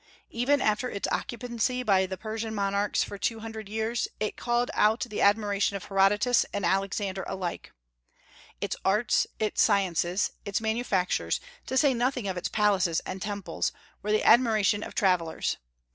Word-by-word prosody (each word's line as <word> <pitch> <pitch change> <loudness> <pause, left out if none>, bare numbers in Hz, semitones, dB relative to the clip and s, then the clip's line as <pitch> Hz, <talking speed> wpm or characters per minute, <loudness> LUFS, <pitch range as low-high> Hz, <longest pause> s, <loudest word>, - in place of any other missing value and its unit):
Even 260 +4 +2
after 215 +4 +1
its 200 - -3
occupancy 245 +1 -2
by 190 -4 +3
the 190 0 -5
Persian 220 +2 -4
monarchs 200 0 +1
for 200 - -7
two 225 +1 -1
hundred 220 -2 -7
years, 220 +2 -1
it 215 - -2
called 240 0 0
out 215 +2 +3
the 220 -4 -3
admiration 205 -1 +2
of 195 - -5
Herodotus 205 +5 +3
and 205 - -2
Alexander 195 0 -1
alike. 180 -3 -5 0.9
Its - - -2
arts, 210 +4 +2
its 215 -1 0
sciences, 185 -2 +2
its 200 -1 -1
manufactures, 220 -4 0 0.3
to 260 - -1
say 275 0 +4
nothing 245 -2 -1
of 190 - -2
its 180 - -3
palaces 195 -6 +2
and 185 0 -6
temples, 200 -4 -2 0.3
were 210 - -2
the 215 - +2
admiration 220 -4 +4
of - - -7
travellers. 180 -6 +1
210 Hz, 155 wpm, -28 LUFS, 195-230 Hz, 0.9 s, say